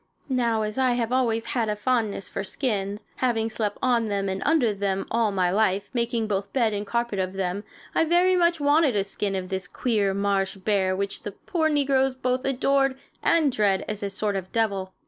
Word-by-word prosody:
Now, 235 -4 +1
as 215 +4 -3
I 255 -2 +3
have 240 -1 -1
always 235 -3 +1
had 230 -4 0
a 210 - 0
fondness 215 -3 -1
for 195 - -4
skins 205 -2 -3
having 225 -3 0
slept 210 -2 -2
on 240 -3 +2
them 200 -1 -1
and 190 0 -3
under 280 -8 +3
them 195 -1 -1
all 225 -2 +2
my 185 -2 +1
life, 200 -1 +1
making 235 -2 0
both 200 -1 -2
bed 230 -5 +2
and 205 0 -3
carpet 235 -3 -1
of 185 0 -1
them 190 +1 -2 0.3
I - - +3
very 350 +3 +3
much 340 -2 +3
wanted 290 -3 +3
a 200 - +2
skin 195 0 -2
of 185 -1 -4
this 190 -1 -3
queer 205 -6 0
marsh 200 -1 0
bear 190 -1 +1
which 200 +1 -3
the 205 - -6
poor 320 - -1
negroes 270 -3 +2
both 255 0 -1
adore 270 0 +2 0.3
and 315 -4 +3
dread 200 -4 +1
as 210 -1 -4
a 200 - -2
sort 205 +1 -1
of 190 -1 -4
devil. 200 -5 0
215 Hz, 205 wpm, -25 LUFS, 195-255 Hz, 0.3 s, I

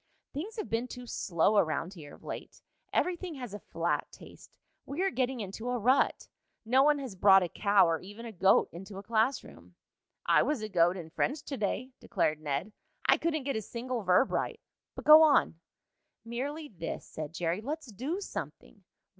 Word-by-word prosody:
"Things 360 +11 -5
have 430 - -4
been 230 +2 -1
too 250 0 -9
slow 200 -2 +1
around 165 +2 -1
here 150 -6 -11
of - - -21
late. - - -8 0.3
Everything 360 -2 -1
has 250 -6 -7
a 205 - -6
flat - - -2
taste. - - -15 0.3
We 310 +7 -3
are 390 - +1
getting 255 -3 -1
into 210 +4 -5
a 250 - 0
rut. 250 +4 +2 0.4
No 255 +4 +4
one 295 +1 +4
has 265 -6 -6
brought 195 0 +6
a - - -1
cow, 200 +1 +3
or 165 -1 0
even 205 +5 -10
a 230 - -6
goat, 195 -1 +3
into 190 +3 -9
a 195 - -7
class 225 +5 +1
room." - - -15 0.5
"I - - +5
was 290 -7 -1
a 215 - -4
goat 175 -1 +3
in 160 -3 -8
French 285 - -1
to 280 - -5
day," 235 +3 -2
declared 155 0 -1
Ned. 150 +8 -3 0.3
"I - - +5
couldn't 315 -3 -1
get 275 0 -2
a 220 - -1
single 240 +3 -4
verb 185 +6 +3
right. 455 - -2 0.4
But - - -8
go 305 +1 +10
on." 290 - +4 0.7
"Merely 280 +7 -4
this," 170 - -6
said 155 +1 -7
Jerry. 170 +4 -1
"Let's 290 +1 -5
do 280 - -3
something." - - -7
230 Hz, 190 wpm, -30 LUFS, 190-275 Hz, 0.7 s, go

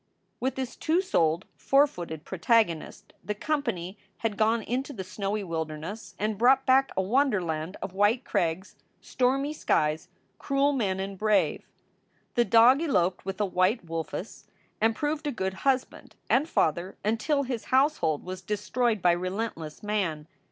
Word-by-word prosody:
With 260 0 -1
this 260 -2 -4
two 325 +3 +1
souled, 170 - +1
four 275 +1 +4
footed 165 - -7
protagonist 190 -3 0
the 210 - -3
com 305 +7 -1
pany 190 -7 -4 0.3
had 215 -2 0
gone 220 +1 +2
into 265 +6 -3
the 195 -6 -5
snowy 200 +2 -3
wilderness 165 +4 -5
and 210 -1 -2
brought 265 +3 +5
back 270 +1 +4
a 190 - +2
wonderland 185 - 0
of 185 - -5
white 205 +6 +2
crags, 185 -1 -1 0.2
stormy 270 +4 0
skies, 155 - 0 0.3
cruel 280 +1 +1
men 200 -8 0
and 195 0 -5
brave. 215 -1 +1 0.7
The 240 -1 +3
dog 240 +6 +6
eloped 185 - +1
with 195 0 -4
a 210 - +2
white 185 +3 +1
wolf 165 -1 -4
ess, 205 - -7 0.4
and 225 0 +3
proved 300 +2 -2
a - - 0
good 190 -6 -2 0.2
husband 260 -1 -2 0.2
and 290 +5 +3
father 170 - 0
until 230 +7 +1
his 245 -4 -4
household 260 - +2
was 185 0 -6
destroyed 215 +1 -1
by 175 - +6
relentless 180 -3 -4
man. 185 -8 -2
210 Hz, 155 wpm, -27 LUFS, 180-260 Hz, 0.7 s, dog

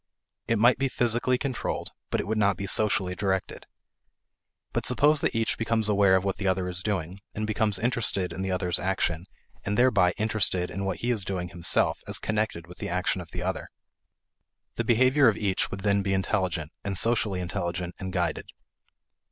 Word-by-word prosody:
It 115 - +2
might 120 +4 +4
be 135 0 +1
physically 120 +1 +1
controlled, 130 -1 -3 0.2
but - - 0
it - - -2
would 110 +1 -1
not 100 -3 +2
be 100 - -4
socially 100 -2 +1
directed. 95 0 -2 1.1
But - - -1
suppose 150 +1 +4
that - - 0
each 115 0 0
becomes 115 -1 +1
aware 100 -2 +4
of 95 - +2
what 95 -1 -1
the 100 - -2
other 95 -1 +1
is 90 0 -3
doing, 95 -2 -3 0.2
and 110 - -2
becomes 110 -1 0
interested 100 -5 0
in 95 - -5
the 95 - -2
other's 90 -1 +1
action 90 -2 -1 0.4
and 105 +1 -2
thereby 100 -8 +4
interested 105 -5 0
in 100 +1 -4
what 95 - -3
he 120 - 0
is 110 -5 +1
doing 90 -2 -3
himself 85 0 +1
as - - 0
connected 105 -6 -1
with 90 +1 -14
the - - -4
action 90 +1 -1
of 85 - -11
the 85 +1 -5
other. 95 +1 -3 1.0
The 115 - -2
behavior 130 +4 +4
of 110 - +3
each 100 -3 0
would 95 - -6
then 100 0 +2
be 95 0 -1
intelligent; 95 -5 -1
and 100 -2 -1
socially 110 -3 +2
intelligent 85 0 -3
and 95 -1 -5
guided. 90 -3 -1
95 Hz, 190 wpm, -27 LUFS, 90-110 Hz, 1.1 s, might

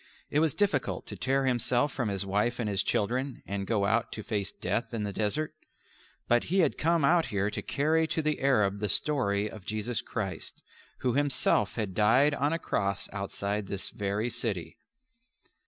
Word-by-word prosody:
It 150 - +3
was 160 -2 +2
difficult 145 - 0
to 105 - -7
tear 135 +8 +1
himself 125 +2 +1
from 120 -6 -1
his 100 0 -2
wife 105 +5 0
and 115 - -1
his 100 -2 +2
children 125 +5 -1
and 100 -1 -3
go 105 -3 +1
out - - +1
to - - -6
face 100 -2 -2
death 115 +1 -2
in 110 - -2
the 100 -1 -3
desert. 150 +11 -1 0.7
But 120 0 +3
he 190 +3 +2
had - - +2
come 165 -2 +2
out 165 +2 +4
here 100 0 0
to - - -3
carry 160 +3 +1
to 160 - -1
the 150 -1 0
Arab 105 -8 +2
the 105 0 -1
story 105 - +1
of 105 -2 -9
Jesus 110 +4 -2
Christ, 95 -7 -5 0.4
who 125 -2 +1
Himself 140 -7 +2
had 105 -5 -2
died 120 +9 +4
on 145 +1 +1
a 165 - +1
Cross 100 -10 -1
outside 100 0 -3
this 100 0 -2
very 105 +3 -2
city. 110 -8 -3
115 Hz, 185 wpm, -29 LUFS, 100-140 Hz, 0.7 s, out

